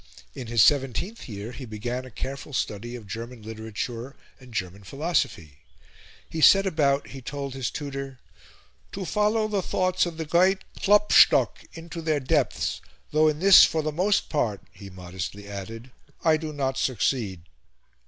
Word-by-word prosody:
In 130 -4 -7
his 115 -2 +4
seventeenth 145 - +1
year 105 +2 -6
he 125 +2 -9
began 120 +3 -4
a - - -10
careful 135 +5 -7
study 120 0 -3
of 115 -3 -9
German 115 +2 -7
literature 110 +4 -6 0.2
and 130 -1 -15
German 100 -2 -4
philosophy. 135 - -2 0.7
He 160 - -5
set 195 +5 +7
about, 145 -6 +1
he 135 - -9
told 140 +1 -5
his 135 -3 -2
tutor, 135 -2 -6 0.8
"to 195 -1 -4
follow 210 +3 +1
the 205 -2 -1
thoughts 185 0 0
of 165 -2 -7
the 160 - -3
great 185 +4 +3 0.2
Klopstock 210 +1 +5
into 165 +1 -8
their 155 -2 0
depths 130 - 0 0.3
though 155 +1 +4
in 155 -1 +1
this, 190 +3 +8
for 160 -1 +2
the 155 - -1
most 185 +6 +1
part," 110 -10 -1
he 100 0 -12
modestly 95 +2 -7
added, 110 +5 -8 0.3
"I 160 -1 +5
do 155 0 -4
not 135 -2 -2
succeed." 110 -6 -1
135 Hz, 155 wpm, -25 LUFS, 110-160 Hz, 0.8 s, this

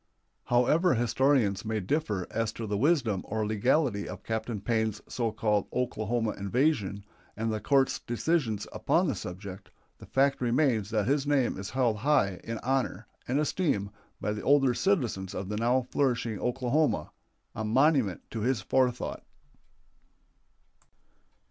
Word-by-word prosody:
However 140 +8 +3
historians 120 -3 +2
may 110 -1 -1
differ 105 - -1
as 115 0 -1
to 115 - -5
the 105 -1 -2
wisdom 120 - +2
or 110 0 -2
legality 110 +1 +1
of 90 +1 -8
Captain 110 -1 -3
Payne's 110 0 -1
so 115 -3 -1
called 105 -2 0
Oklahoma 115 -2 -1
invasion 100 -2 0 0.3
and 110 0 -1
the 110 - -2
court's 135 +2 +2
decisions 120 -4 -1
upon 180 - +2
the 140 - +1
subject, 95 0 -8 0.3
the - - -12
fact 135 0 +2
remains 120 -4 +2
that 110 -3 0
his 140 +2 +1
name 140 -4 +2
is 100 +1 -6
held 125 -5 +1
high 105 -7 +2
in 115 0 -4
honor 130 -5 -1 0.2
and 130 +4 +1
esteem 145 - 0 0.3
by 105 - -2
the 105 - -5
older 135 -2 +4
citizens 120 - 0
of 95 - -4
the 105 - -2
now 120 +3 +2
flourishing 120 -6 0
Oklahoma 125 - 0 0.4
a 110 - -4
monument 125 - +2
to 115 - -4
his 125 +1 +1
forethought. 125 +5 0
115 Hz, 140 wpm, -29 LUFS, 105-135 Hz, 0.4 s, older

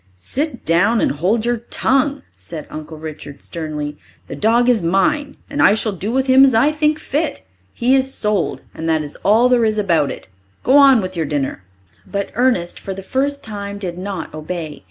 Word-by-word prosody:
"Sit 260 - -3
down 200 +8 +3
and - - +2
hold 195 +10 0
your 240 0 +1
tongue," 275 +1 +1
said 160 -3 -8
Uncle 155 +1 -8
Richard 150 -2 -9
sternly. 150 -2 -5 0.3
"The - - -6
dog 235 +3 +3
is 245 -3 +3
mine, 275 - +1
and 285 +1 -2
I 210 - +6
shall 220 0 -1
do 200 +3 -4
with 265 +1 +1
him 265 0 +6
as 265 -4 +5
I 270 +7 +4
think 305 0 +1
fit. 305 +1 -2 0.3
He 245 - +1
is 265 0 +1
sold, 210 -7 -1
and 160 +1 -4
that 160 -1 +1
is 145 - -4
all 220 +5 +4
there 250 -2 +3
is 215 -1 +1
about 165 -8 +2
it. - - -8 0.4
Go 260 - +3
on 270 -6 +7
with 185 0 -5
your 165 -3 -1
dinner." 140 -9 -2 0.4
But 200 -1 -3
Ernest 235 -9 +1
for 195 - -6
the 195 - -8
first 280 +6 -1
time 200 -2 -5
did 185 -4 -5
not 185 -2 -5
obey. 155 0 -6
205 Hz, 195 wpm, -19 LUFS, 165-260 Hz, 0.4 s, on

